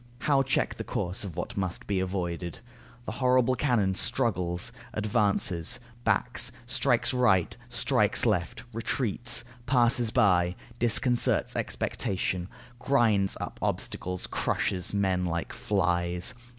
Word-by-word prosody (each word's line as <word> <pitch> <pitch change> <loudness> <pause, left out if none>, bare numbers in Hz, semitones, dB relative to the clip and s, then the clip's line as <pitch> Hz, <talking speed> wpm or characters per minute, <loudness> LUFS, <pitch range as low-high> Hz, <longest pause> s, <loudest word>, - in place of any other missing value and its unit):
How 140 -2 +3
check 135 0 0
the - - -4
course 90 +3 -2
of 95 -6 -7
what - - -4
must 95 -2 -3
be 100 -2 0
avoided? 90 -2 -3 0.5
The - - -4
horrible 125 +1 +2
cannon 120 -7 +1
struggles, 90 -5 +1 0.2
advances, 100 -5 +1 0.2
backs, - - +1
strikes 130 - +1
right, 105 -9 +3
strikes - - +2
left, - - 0
retreats, 120 +1 0 0.2
passes 120 -2 +3
by, 90 -4 +3 0.2
disconcerts 120 +1 +2
expectation, 90 -1 -2 0.3
grinds 115 -8 +2
up - - -6
obstacles, 90 0 -2
crushes 90 0 -1
men 95 -3 +1
like 85 0 -3
flies. 90 +3 0
100 Hz, 110 wpm, -28 LUFS, 90-120 Hz, 0.5 s, How